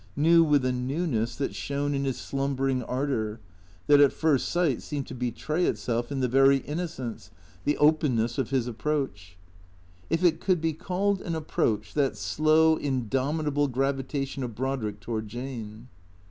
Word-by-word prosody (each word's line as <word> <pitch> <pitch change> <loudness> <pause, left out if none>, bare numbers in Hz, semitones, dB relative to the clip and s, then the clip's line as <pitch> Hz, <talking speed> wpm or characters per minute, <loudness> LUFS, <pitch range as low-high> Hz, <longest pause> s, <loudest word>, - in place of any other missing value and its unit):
ISTew 165 +3 +6
with 145 -4 +3
a 130 - +2
newness 125 -2 -1
that 135 - -2
shone 145 +1 -2
in 140 0 -1
his 135 -2 -1
slumbering 135 -1 -1
ardour; 120 -4 -2 0.5
that 145 -1 +6
at 140 - +6
first 155 -5 +1
sight 170 -8 +1
seemed 145 -3 -4
to - - -9
betray 125 +8 -1
itself 120 +1 -1
in 135 -2 -2
the 130 - +2
very 135 +2 +5
innocence, 150 -5 -5 0.4
the 145 - +1
openness 135 -6 +2
of 130 - -1
his 130 -3 +1
approach. 120 - -3 0.7
If 165 +3 0
it 165 -2 +4
could 185 -3 +1
be 160 0 0
called 190 +4 -1
an 170 - -3
approach, 110 -9 -1
that 140 -3 +1
slow, 160 +1 +3
indomitable 140 +3 0
gravitation 135 +1 -2
of 120 -4 -4
Brodrick 115 -5 -3
toward 110 -2 -4
Jane. 115 -1 -7
135 Hz, 155 wpm, -27 LUFS, 125-155 Hz, 0.7 s, ISTew